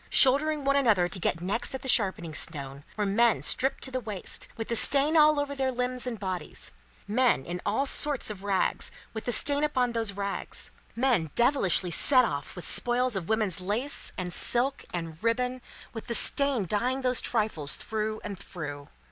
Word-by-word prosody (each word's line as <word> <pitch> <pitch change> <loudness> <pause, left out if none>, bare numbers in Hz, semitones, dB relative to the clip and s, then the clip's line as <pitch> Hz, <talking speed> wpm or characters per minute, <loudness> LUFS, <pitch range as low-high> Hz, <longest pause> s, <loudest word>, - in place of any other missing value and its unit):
Shouldering 295 +3 +4
one 275 0 +2
another 220 -10 +3
to 185 - -3
get 165 -1 -1
next 220 +8 -1
at 265 - -7
the - - -6
sharpening 190 -9 +3
stone, 140 -3 -3
were 210 - 0
men 225 +3 +2
stripped 270 +1 +1
to 265 - 0
the 255 - -2
waist, 210 -6 -3
with 225 - -5
the 235 - 0
stain 285 +6 +4
all 305 -1 +5
over 285 0 -2
their 265 -1 -1
limbs 250 0 -2
and 230 -4 -4
bodies; 185 -3 -5 0.4
men 235 - +2
in 175 +1 -5
all 220 +7 0
sorts 280 -4 +2
of 200 -2 -9
rags, 200 -2 +1 0.2
with 220 -1 -6
the 245 - -1
stain 285 +5 +3
upon 255 -5 0
those 225 -3 -1
rags; 200 0 -3 0.2
men 235 - +1
devilishly 235 - +2
set 255 +6 +4
off 140 -8 -5
with 175 - -5
spoils 245 -1 +1
of 180 -4 -4
women's 215 -5 0
lace 220 +10 -3
and 180 -1 -4
silk 255 +8 -1
and 165 0 -6
ribbon, 250 +2 -1 0.3
with 225 0 -8
the 235 - 0
stain 275 -3 +1
dyeing 250 +8 -1
those 250 -1 +5
trifles 210 -11 +2
through 215 0 -3
and 195 -3 -6
through. 145 -5 -8
230 Hz, 185 wpm, -27 LUFS, 190-260 Hz, 0.4 s, all